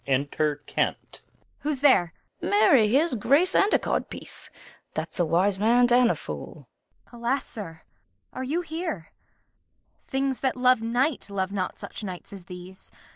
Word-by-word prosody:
Kent. - - -2 0.4
Who's 290 -3 -2
there? 195 - +5 0.3
Fool. - - -3
Marry, 215 +3 +5
here's 285 +8 +2
grace 280 - +3
and 405 - +4
a - - +5
codpiece; - - -3 0.5
that's - - -4
a 175 - +3
wise 190 +4 +2
man 240 +3 +4
and 245 -1 +5
a - - +1
fool. - - -8 0.4
Kent. 240 -1 -12
Alas, 255 +4 0
sir, 165 -7 -7 0.5
are 260 - -4
you 305 +7 -1
here? 320 - -5 1.0
Things 270 -1 -1
that 265 -1 0
love 250 -2 +4
night 245 +3 0
Love 190 -1 -2
not 190 -2 -3
such - - -8
nights 185 0 -7
as 190 -3 -10
these. 180 +1 -11
235 Hz, 150 wpm, -26 LUFS, 195-270 Hz, 1.0 s, there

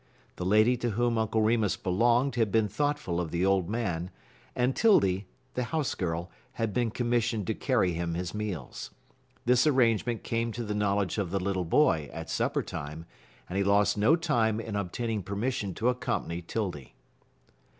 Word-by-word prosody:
The 90 - -4
lady 110 +5 +4
to 120 0 -1
whom 120 -1 +2
Uncle 110 0 +1
Remus 110 -3 +2
belonged 120 +8 +2
had 115 -4 +1
been 110 0 +3
thoughtful 115 -6 -1
of 85 - -4
the 85 +3 0
old 95 -2 +2
man, 90 -7 -2 0.5
and 125 +2 +1
'Tildy, 100 - +3 0.3
the 125 - -1
house 155 0 -1
girl, 85 -1 -3 0.2
had 115 -3 -2
been 120 +1 +1
commissioned 120 -2 0
to - - 0
carry 90 - +1
him 85 0 -2
his 90 0 -3
meals. 105 -11 -5 0.6
This 125 +4 +4
arrangement 120 -4 +2
came 115 0 -1
to 120 - -4
the 105 -1 -3
knowledge 100 -1 0
of 95 -4 -1
the 100 +2 -1
little 95 -1 -1
boy 80 - +3
at - - -7
supper - - 0
time, 75 +3 -6 0.4
and 95 +2 -2
he - - +3
lost 100 +1 +3
no 110 +10 +4
time 120 -10 +1
in 110 -2 -5
obtaining 105 +3 -2
permission 100 0 -2
to 115 +2 +1
accompany 120 -8 -2
'Tildy. 85 - -4
105 Hz, 170 wpm, -29 LUFS, 90-120 Hz, 0.6 s, lady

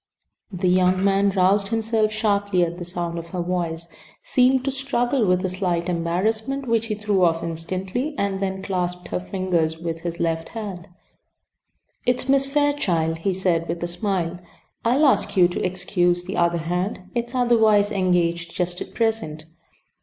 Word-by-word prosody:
The 185 -1 -1
younger 185 +1 +3
man 200 0 +3
roused 195 +1 +3
himself 225 -1 +1
sharply 205 -4 +1
at 170 +1 -3
the - - -4
sound 170 -1 -4
of 165 - -8
her 175 +1 -4
voice, 170 -2 -2 0.4
seemed 255 0 +3
to 275 - +1
struggle 265 -3 0
with 180 +1 +2
a - - 0
slight 180 -2 -1
embarrassment 220 +10 -1
which 230 -1 +1
he 215 - -2
threw 205 -3 +1
off 165 -1 +2
instantly, 185 - -3
and 200 -1 -1
then 190 -1 -3
clasped 180 -2 -3
her - - -1
fingers 180 -4 -1
with 165 0 -4
his 170 0 -4
left 165 -1 -1
hand. 200 -7 -6 1.2
"It's 250 +1 +1
Miss 275 0 +3
Fairchild," 240 - +1
he 195 +4 0
said, 180 -3 0
with 170 +1 -3
a - - 0
smile. 175 -1 -2 0.4
"I'll 255 +6 +3
ask 205 -7 +2
you 180 -2 +7
to 175 - -3
excuse 175 -1 0
the 190 +2 -5
other 170 0 +2
hand; 180 +4 -2
"it's 235 +1 -3
otherwise 220 -4 +4
engaged 175 -3 0
just 180 0 -2
at - - -8
present." 220 -10 -1
185 Hz, 165 wpm, -23 LUFS, 175-220 Hz, 1.2 s, you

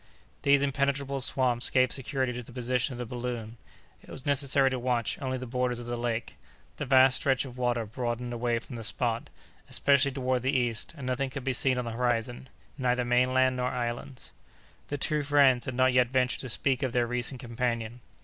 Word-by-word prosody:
These 140 0 +4
impenetrable 140 0 0
swamps 125 -2 +1
gave 130 -1 +3
security 130 -1 -1
to 120 - -5
the 120 - -13
position 125 +2 -1
of - - -7
the 125 - -4
balloon. 120 -1 -5 0.4
It - - -18
was 130 - -8
necessary 140 -1 +3
to 130 - -2
watch 120 -2 -1
only 130 -1 -2
the 130 - -6
borders 125 0 -1
of 120 - -5
the 120 0 -3
lake. 120 -1 -3 0.4
The - - -4
vast 130 0 +6
stretch 135 -1 +1
of 125 -2 -9
water 120 -2 0
broadened 120 +2 -3
away 120 0 0
from 120 +1 -8
the 115 - -6
spot, 115 +1 -1 0.4
especially 140 -1 +3
toward 130 -1 -1
the 130 +2 +1
east, 120 +4 -1
and 140 - -7
nothing 130 +1 -1
could 140 0 -6
be 135 0 0
seen 130 +1 +2
on 125 - -2
the 115 - -4
horizon, 120 +1 -1 0.3
neither 125 -1 +1
mainland 130 +1 +3
nor 125 0 0
islands. 120 +2 -4 0.6
The 145 - -3
two 150 +2 +1
friends 140 -3 +4
had 130 - -4
not 130 0 +3
yet 125 -1 +4
ventured 125 -1 +1
to 130 - -6
speak 135 +3 0
of 130 -3 -1
their 120 -1 +2
recent 125 +2 -3
companion. 120 -1 -3
125 Hz, 200 wpm, -28 LUFS, 120-130 Hz, 0.6 s, vast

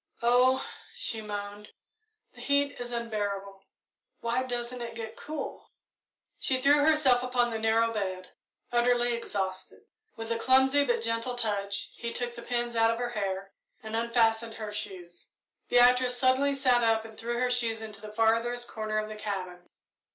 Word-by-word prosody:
"Oh!" 250 +2 +4 0.3
she 225 -1 -2
moaned, 205 0 -6 0.6
"the - - -13
heat 280 0 +1
is 245 0 -5
unbearable 205 -4 -3 0.6
why 235 +2 0
doesn't 245 -1 -4
it 235 -1 -6
get 225 -1 -6
cool!" 305 -2 -7 0.7
She 260 -1 +1
threw 285 +3 +5
herself 290 -5 +4
upon 245 -1 +1
the 225 - -3
narrow 225 +1 +2
bed, 185 -3 -4 0.4
utterly 240 0 +3
exhausted. 190 -5 -4 0.3
With 225 0 -6
a 230 - 0
clumsy, 265 +3 +4
but 240 -3 0
gentle 230 +2 -1
touch, 200 -4 -2
he 235 -1 -5
took 240 0 -3
the 235 - -9
pins 240 -1 -2
out 225 0 +4
of 230 - 0
her 245 0 -2
hair 195 -3 -3 0.3
and 220 0 -5
unfastened 230 -1 +1
her 215 -1 -6
shoes. 185 -4 -7 0.4
Beatrice 250 0 +5
suddenly 265 +2 +3
sat 255 -3 +3
up 225 -1 +2
and 220 -1 -11
threw 235 +2 -3
her 250 0 +1
shoes 230 -2 +2
into 215 -2 -9
the 215 -1 -8
farthest 230 +2 +1
corner 215 -1 -3
of 215 0 -1
the 215 - -7
cabin. 185 -4 -5
230 Hz, 160 wpm, -29 LUFS, 215-245 Hz, 0.7 s, threw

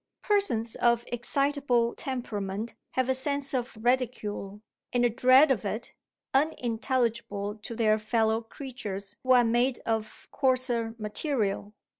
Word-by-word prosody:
Persons 240 - +1
of 235 0 +3
excitable 245 -1 +1
temperament 215 -4 -4 0.2
have 260 -1 +1
a 260 - +3
sense 280 +1 +1
of 245 -3 -2
ridicule, 220 -4 -1 0.3
and 245 0 +2
a 240 - +3
dread 260 +5 +6
of 235 -6 +1
it, 215 +3 -4 0.4
unintelligible 235 -6 0
to 225 +2 -8
their 215 -1 +3
fellow 220 +1 +1
creatures 225 -5 -6
who 255 0 +4
are 245 -1 +6
made 240 +2 +2
of 220 -1 -3
coarser 255 -4 +1
material. 210 -2 -2
235 Hz, 125 wpm, -28 LUFS, 220-260 Hz, 0.4 s, dread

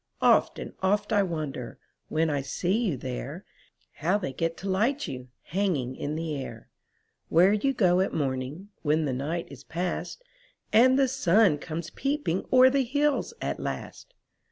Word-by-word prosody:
Oft - - +4
and - - -7
oft 205 +3 +1
I 205 - +5
wonder. 155 -9 -4 0.3
When 160 0 +1
I 145 -1 0
see 170 +7 -1
you 170 -10 0
there, - - -6 0.5
How 180 +6 +2
they 180 -10 -4
get 165 +4 -2
to 195 - -6
light 230 +10 +1
you, 125 -1 -6 0.2
Hanging 160 -9 -1
in 150 +3 -3
the 160 -1 -3
air. 125 -5 -7 0.6
Where 180 +5 +5
you 240 +6 +2
go 185 -8 +3
at 190 - +1
morning. 140 +6 -3
When 155 +1 +2
the 135 - -1
night 155 +7 -3
is 140 0 -11
past. 180 - -4 0.5
And 255 +4 +6
the 275 -1 +4
sun 210 - +3
comes 165 +1 -5
peeping 275 - -1
O'er 260 0 +7
the 275 0 +2
hills 290 - 0
at - - -2
last. - - -6
175 Hz, 165 wpm, -27 LUFS, 145-215 Hz, 0.6 s, O'er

